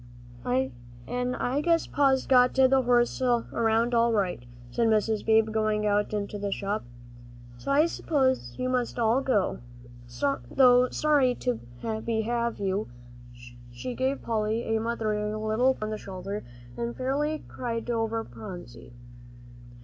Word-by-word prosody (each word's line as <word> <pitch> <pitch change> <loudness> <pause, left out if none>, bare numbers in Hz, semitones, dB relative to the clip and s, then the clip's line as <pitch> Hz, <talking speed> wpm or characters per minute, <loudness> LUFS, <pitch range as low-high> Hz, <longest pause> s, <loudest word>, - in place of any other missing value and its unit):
"An' 125 - -3
I 265 +4 -1
guess 335 +1 +2
Pa's 270 -2 +2
got 250 -1 +4
the 265 0 +5
horse 240 0 +2
around 235 -1 +1
all 235 0 +4
right," 190 - 0 0.3
said 230 - +1
Mrs. 220 0 +1
Beebe, 220 0 +3
going 215 -1 0
out 205 0 +1
into 205 0 -3
the 200 0 -3
shop, 200 +2 -2 0.8
"so - - -7
I 295 +3 +5
s'pose 260 - 0
you 255 - -2
all - - -1
must 250 -2 -1
go, 235 -2 +1 0.9
though 250 -1 +5
sorry 285 -5 +2 0.5
I 220 -1 -2
be 225 0 -1
to 220 - -4
have 235 -1 -1
you." 200 +1 -1 0.8
She 120 - -6
gave 265 +3 -1
Polly 225 0 -1
a - - +1
motherly 215 -2 -1
little 220 +5 +1
pat - - -7
on 215 - -2
the 215 - -4
shoulder, 195 +2 -6 0.3
and 235 0 -4
fairly 290 +4 -1
cried 235 -1 -4
over 225 -1 -1
Phronsie. 120 +2 -10
230 Hz, 140 wpm, -27 LUFS, 210-255 Hz, 0.9 s, the